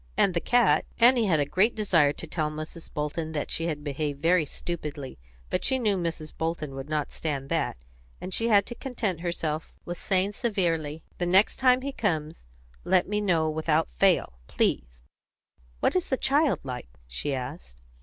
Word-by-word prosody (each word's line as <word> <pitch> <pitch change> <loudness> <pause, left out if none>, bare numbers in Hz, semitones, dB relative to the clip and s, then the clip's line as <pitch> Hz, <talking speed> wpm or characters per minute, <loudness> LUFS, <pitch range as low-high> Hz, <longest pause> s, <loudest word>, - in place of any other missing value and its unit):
"And 190 - +4
the 170 - +1
cat." 230 -11 +3
Annie 240 -1 +5
had 160 -5 +3
a 145 - +2
great 190 +10 +2
desire 170 -9 +3
to 155 - -6
tell 155 -1 -1
Mrs. 155 +2 -8
Bolton 155 +1 -3
that 150 - -3
she 165 - 0
had 150 -3 -3
behaved 145 0 -3
very 165 +1 +3
stupidly. 150 - -6 0.3
But - - 0
she 265 - +3
knew 215 -5 +1
Mrs. 165 -3 -4
Bolton 160 -3 -3
would 135 +2 -7
not 150 -2 -1
stand 140 -4 -3
that, 165 - 0 0.4
and 185 - -6
she 230 - +2
had 205 -3 +5
to - - -5
content 235 - -3
herself 165 -2 -3
with 175 0 -5
saying, 190 +1 +1
severely, 165 - -1 0.2
"The 175 - 0
next 190 +4 +4
time 255 -1 +4
he 280 +1 -3
comes, 160 - -2 0.4
let 185 -1 +3
me 210 +1 0
know 170 -6 +2
without 155 - +1
fail, - - +2
please. - - -1 0.8
What - - +2
is 365 - 0
the 265 - +1
child 285 +3 +2
like?" 125 - -6 0.2
she 60 - -2
asked. 130 - -7
165 Hz, 180 wpm, -27 LUFS, 150-200 Hz, 0.8 s, Annie